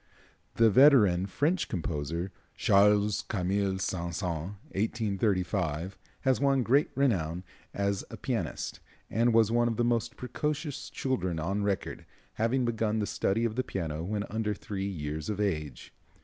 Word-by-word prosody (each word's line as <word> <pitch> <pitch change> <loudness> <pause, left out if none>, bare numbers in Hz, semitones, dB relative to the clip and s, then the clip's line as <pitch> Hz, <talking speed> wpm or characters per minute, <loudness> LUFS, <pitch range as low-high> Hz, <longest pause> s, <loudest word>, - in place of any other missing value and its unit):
The 115 -1 +5
veteran 105 -8 +6
French 155 - 0
composer, 85 +1 -3 0.2
Charles 105 +1 +4
Camille 95 -1 -1
Saint 85 -2 -2
Saëns 85 +1 -3 0.2
(1835 95 -5 -1
), - - -34
has 130 -1 +2
won 135 -2 +3
great 140 +6 +3
renown 90 - +1 0.3
as 100 -1 -1
a - - -8
pianist, - - -3 0.3
and 115 +2 +3
was 115 -1 +4
one 120 0 +3
of 115 - -1
the 120 - +2
most 115 -1 0
precocious 145 +3 -3
children 95 -11 -2
on 95 +6 -1
record, 100 -1 -2 0.3
having 120 +3 +1
begun 110 -2 0
the 105 - 0
study 110 +3 0
of 110 -1 -2
the 130 - 0
piano 80 -8 -4
when 100 +3 -2
under 110 -1 -2
three 100 0 -4
years 75 -3 -4
of 105 -1 -2
age. 75 -9 -3
100 Hz, 150 wpm, -29 LUFS, 90-115 Hz, 0.3 s, veteran